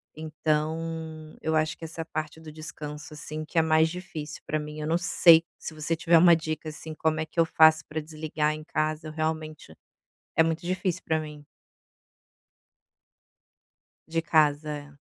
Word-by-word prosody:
Então, 155 Hz, 0 st, -3 dB
eu 160 Hz, 0 st, 0 dB
acho 155 Hz, 0 st, +1 dB
que -, -, -14 dB
essa 165 Hz, 0 st, -6 dB
parte 155 Hz, 0 st, -5 dB
do 160 Hz, -1 st, -10 dB
descanso, 150 Hz, -1 st, -8 dB
assim, 155 Hz, +1 st, -5 dB
que 160 Hz, -, -7 dB
é -, -, +7 dB
mais 160 Hz, 0 st, +4 dB
difícil 160 Hz, -4 st, -7 dB
pra 155 Hz, -, -1 dB
mim. 150 Hz, 0 st, -7 dB
Eu 150 Hz, -, -3 dB
não 165 Hz, +2 st, +2 dB
sei 170 Hz, -2 st, +6 dB
se -, -, -7 dB
você 155 Hz, +1 st, -1 dB
tiver 170 Hz, +1 st, +4 dB
uma 170 Hz, +1 st, +7 dB
dica, 155 Hz, -1 st, -4 dB
assim, 155 Hz, +1 st, -8 dB
como 155 Hz, 0 st, 0 dB
é 160 Hz, -, -1 dB
que 160 Hz, -, -6 dB
eu 165 Hz, -, +6 dB
faço 160 Hz, -1 st, +5 dB
pra 155 Hz, +1 st, -3 dB
desligar 155 Hz, 0 st, -2 dB
em 155 Hz, 0 st, -7 dB
casa, 155 Hz, 0 st, -2 dB
realmente, 155 Hz, -, -4 dB, 0.6 s
é -, -, +7 dB
muito 165 Hz, 0 st, 0 dB
difícil 185 Hz, 0 st, -1 dB
para 160 Hz, 0 st, +1 dB
mim. 150 Hz, -1 st, -9 dB, 2.6 s
De 165 Hz, 0 st, 0 dB
casa, 150 Hz, -1 st, +2 dB
é. 145 Hz, 0 st, -13 dB
155 Hz, 165 wpm, -27 LUFS, 155-160 Hz, 2.6 s, é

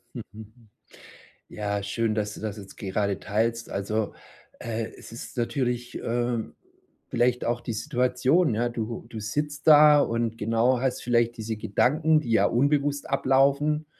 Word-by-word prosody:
Mhm. 110 Hz, +1 st, -11 dB, 0.8 s
Ja, 100 Hz, -1 st, -3 dB
schön, 115 Hz, +1 st, -1 dB
dass 105 Hz, -1 st, -2 dB
du -, -, -10 dB
das 110 Hz, -2 st, -4 dB
jetzt 100 Hz, -2 st, -11 dB
gerade 100 Hz, 0 st, -2 dB
teilst. 115 Hz, +2 st, -1 dB
Also, 105 Hz, +2 st, -2 dB, 0.4 s
äh, 115 Hz, -1 st, -3 dB
es -, -, -13 dB
ist 115 Hz, -, -9 dB
natürlich, 120 Hz, 0 st, -2 dB
ähm, 120 Hz, -1 st, -2 dB, 0.5 s
vielleicht 125 Hz, 0 st, +1 dB
auch 120 Hz, 0 st, -1 dB
die 120 Hz, -1 st, -5 dB
Situation, 125 Hz, +4 st, +1 dB
ja. 120 Hz, +2 st, 0 dB
Du 115 Hz, -1 st, -5 dB
du 110 Hz, -2 st, -7 dB
sitzt 145 Hz, +7 st, -3 dB
da 150 Hz, -1 st, +8 dB
und, 115 Hz, -2 st, -1 dB
genau, 115 Hz, +3 st, +2 dB
hast 130 Hz, -1 st, -1 dB
vielleicht 120 Hz, -1 st, +1 dB
diese 110 Hz, 0 st, -4 dB
Gedanken, 155 Hz, +10 st, +2 dB
die 120 Hz, -, -6 dB
ja -, -, +4 dB
unbewusst 145 Hz, +3 st, +1 dB
ablaufen. 140 Hz, +3 st, +2 dB
120 Hz, 145 wpm, -26 LUFS, 110-135 Hz, 0.8 s, da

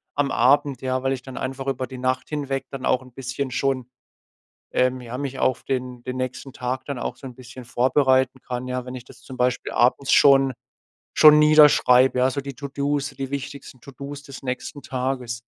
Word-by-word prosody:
am 145 Hz, -1 st, 0 dB
Abend, 140 Hz, +2 st, +2 dB
ja, 130 Hz, 0 st, -1 dB
weil 135 Hz, 0 st, +1 dB
ich 130 Hz, -, -5 dB
dann 130 Hz, 0 st, -10 dB
einfach 135 Hz, +1 st, -4 dB
über 130 Hz, -1 st, -1 dB
die 130 Hz, -, -9 dB
Nacht 130 Hz, 0 st, -1 dB
hinweg 140 Hz, -3 st, -3 dB
dann 135 Hz, -1 st, -6 dB
auch 130 Hz, -, +2 dB
'n 130 Hz, -, -16 dB
bisschen 130 Hz, +1 st, -4 dB
schon 130 Hz, -1 st, -1 dB, 0.8 s
ähm, 130 Hz, 0 st, +1 dB
ja, 120 Hz, 0 st, -7 dB
mich 135 Hz, -1 st, -5 dB
auf 130 Hz, -, 0 dB
den 125 Hz, -2 st, -4 dB
den 130 Hz, +1 st, -5 dB
nächsten 130 Hz, +1 st, -5 dB
Tag 125 Hz, +1 st, -4 dB
dann 140 Hz, -4 st, -5 dB
auch -, -, -4 dB
so -, -, -13 dB
'n 125 Hz, -, -11 dB
bisschen 125 Hz, 0 st, -11 dB
vorbereiten 130 Hz, +1 st, +2 dB
kann, 125 Hz, 0 st, -5 dB
ja? 125 Hz, 0 st, -3 dB
Wenn 125 Hz, -, -7 dB
ich 125 Hz, -1 st, -9 dB
das -, -, -16 dB
zum 130 Hz, -2 st, -11 dB
Beispiel 125 Hz, 0 st, 0 dB
abends 130 Hz, +3 st, +2 dB
schon 135 Hz, -1 st, +5 dB, 0.6 s
schon 150 Hz, 0 st, +8 dB
niederschreibe, 150 Hz, -4 st, +6 dB
ja, 130 Hz, +1 st, +3 dB
so 140 Hz, +2 st, -3 dB
die 140 Hz, 0 st, -7 dB
To 140 Hz, +2 st, -7 dB
do's, 140 Hz, +1 st, -2 dB
die 135 Hz, -1 st, -6 dB
wichtigsten 140 Hz, -2 st, -7 dB
To 140 Hz, -, -13 dB
do's 140 Hz, +2 st, -8 dB
des 140 Hz, -2 st, -11 dB
nächsten 130 Hz, +2 st, -5 dB
Tages. 125 Hz, -2 st, -3 dB
130 Hz, 205 wpm, -23 LUFS, 125-140 Hz, 0.8 s, schon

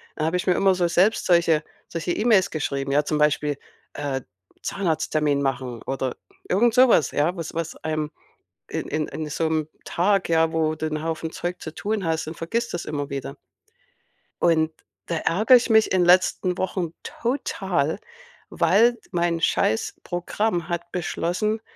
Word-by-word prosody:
Da 155 Hz, -, -1 dB
habe 165 Hz, +3 st, +1 dB
ich 185 Hz, -, -4 dB
mir 180 Hz, -, +5 dB
immer 195 Hz, -1 st, +4 dB
so 175 Hz, -1 st, +1 dB
selbst 185 Hz, +6 st, +2 dB
solche 170 Hz, -3 st, +4 dB, 0.3 s
solche 170 Hz, +1 st, -3 dB
E-Mails 210 Hz, -4 st, +3 dB
geschrieben, 140 Hz, -3 st, -2 dB
ja? 150 Hz, +1 st, +3 dB
Zum 150 Hz, -, 0 dB
Beispiel, 150 Hz, -1 st, +2 dB, 0.4 s
äh, 140 Hz, -2 st, -3 dB, 0.4 s
„Zahnarzttermin 155 Hz, -5 st, 0 dB
machen“ 125 Hz, -3 st, -2 dB
oder 135 Hz, -1 st, -3 dB, 0.3 s
irgend 230 Hz, +4 st, +3 dB
sowas, 245 Hz, -, +5 dB
ja? 155 Hz, +5 st, +1 dB
Was 165 Hz, -1 st, -5 dB
was 165 Hz, 0 st, -3 dB
einem 155 Hz, -1 st, -2 dB, 0.6 s
in -, -, -4 dB
in 155 Hz, 0 st, -1 dB
in 155 Hz, -1 st, -5 dB
so 160 Hz, +1 st, 0 dB
'nem 155 Hz, -1 st, -1 dB, 0.2 s
Tag, 195 Hz, +2 st, +1 dB
ja, 165 Hz, 0 st, +3 dB
wo 155 Hz, -1 st, +1 dB
du 155 Hz, -, -3 dB
'n 155 Hz, 0 st, -3 dB
Haufen 160 Hz, 0 st, -3 dB
Zeug 180 Hz, +1 st, -4 dB
zu 160 Hz, -, -6 dB
tun 210 Hz, -1 st, -2 dB
hast, 160 Hz, -1 st, -1 dB
dann 160 Hz, -, -6 dB
vergisst 230 Hz, +9 st, -2 dB
du -, -, -1 dB
das 175 Hz, -, -6 dB
immer 145 Hz, -2 st, -3 dB
wieder. 140 Hz, 0 st, -5 dB, 1.1 s
Und 160 Hz, -2 st, +3 dB, 0.4 s
da 170 Hz, -, -1 dB
ärgere 215 Hz, +11 st, +4 dB
ich 245 Hz, -, -2 dB
mich 220 Hz, -1 st, +4 dB
in 180 Hz, -2 st, +3 dB
letzten 180 Hz, 0 st, +3 dB
Wochen 180 Hz, -3 st, -2 dB
total, 195 Hz, -, -1 dB, 0.5 s
weil 235 Hz, +4 st, +4 dB
d 235 Hz, -, -17 dB
mein 170 Hz, -2 st, 0 dB
Scheiß-Programm 175 Hz, -, -1 dB
hat 175 Hz, 0 st, -4 dB
beschlossen, 185 Hz, +5 st, -1 dB
165 Hz, 165 wpm, -24 LUFS, 155-190 Hz, 1.1 s, mir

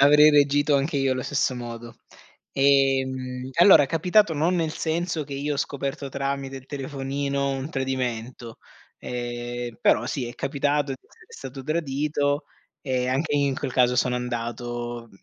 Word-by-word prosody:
Avrei 150 Hz, +2 st, +7 dB
reagito 145 Hz, 0 st, +4 dB
anche 140 Hz, +2 st, 0 dB
io 135 Hz, -1 st, +2 dB
allo 130 Hz, -1 st, -2 dB
stesso 130 Hz, -2 st, 0 dB
modo. 120 Hz, -1 st, -8 dB, 0.6 s
Ehm, 130 Hz, -2 st, +1 dB
allora 175 Hz, -5 st, +8 dB
è -, -, +1 dB
capitato, 175 Hz, +5 st, +3 dB
non 165 Hz, +5 st, +1 dB
nel 160 Hz, -2 st, 0 dB
senso 165 Hz, -1 st, -1 dB
che 140 Hz, 0 st, -8 dB
io 145 Hz, +1 st, -2 dB
ho -, -, -4 dB
scoperto 140 Hz, 0 st, -3 dB
tramite 135 Hz, 0 st, -3 dB
il 130 Hz, -1 st, -9 dB
telefonino 140 Hz, 0 st, -3 dB
un 135 Hz, +2 st, -4 dB
tradimento. 125 Hz, -3 st, -3 dB, 0.4 s
Ehm, 120 Hz, -1 st, -5 dB
però 120 Hz, +3 st, +3 dB
sì, 125 Hz, -4 st, -3 dB
è 120 Hz, -, -8 dB
capitato 145 Hz, 0 st, 0 dB
di -, -, -8 dB
essere -, -, -21 dB, 0.3 s
stato 135 Hz, -, -7 dB
tradito 145 Hz, -1 st, -1 dB, 0.4 s
e 130 Hz, -2 st, -1 dB
anche 145 Hz, +3 st, 0 dB
in 140 Hz, -1 st, +2 dB
quel 135 Hz, -, -3 dB
caso 125 Hz, -1 st, +3 dB
sono 125 Hz, -1 st, +2 dB
andato 120 Hz, -1 st, -4 dB
135 Hz, 155 wpm, -25 LUFS, 125-145 Hz, 0.6 s, allora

